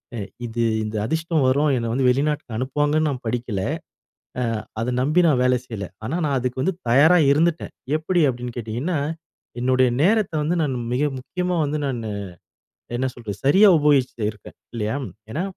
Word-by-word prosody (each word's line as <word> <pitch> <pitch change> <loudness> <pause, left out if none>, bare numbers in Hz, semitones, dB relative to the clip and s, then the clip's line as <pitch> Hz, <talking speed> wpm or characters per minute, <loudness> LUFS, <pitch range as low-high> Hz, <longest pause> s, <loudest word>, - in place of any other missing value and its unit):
அ - - -4 0.3
இது 115 0 -2 0.2
இந்த 105 0 -5
அதிர்ஷ்டம் 160 +1 0
வரும், 145 +4 +3
என்ன 115 -1 -2
வந்து 130 +1 +2
வெளிநாட்டுக்கு 140 -3 0
அனுப்புவாங்கன்னு 145 +4 +1
நான் 130 -3 -4
படிக்கல. 115 -4 -2 0.8
அ - - +1 0.4
அத 120 - -1
நம்பி 155 +7 +3
நான் 135 -5 +3
வேலை 125 0 +3
செய்யல. 105 -6 -6 0.2
ஆனா 135 +8 -2
நான் 140 -2 +1
அதுக்கு 125 +1 -2
வந்து 190 +4 0
தயாரா 155 +9 +6
இருந்துட்டடேன். 165 +3 +1 0.2
எப்டி 170 +2 +1
அப்டின்னு 125 -1 -5
கேட்டீங்கன்னா, 120 +9 -2 0.6
என்னுடைய 130 0 +3
நேரத்த 210 0 +2
வந்து 165 +4 0
நான் 135 -4 -1 0.2
மிக 130 +4 +1 0.2
முக்கியமா 180 +7 -2
வந்து 145 +1 -2
நானு 120 -5 -3 0.9
என்ன 130 +2 0
சொல்றது 110 -5 -6
சரியா 190 +10 +6
உபயோகிச்சுட்டு 135 -6 +2
இருக்கேன். 105 - -15 0.2
இல்லையா. 110 +1 -2 0.4
ஏனா 165 - -2
130 Hz, 160 wpm, -22 LUFS, 120-155 Hz, 0.9 s, தயாரா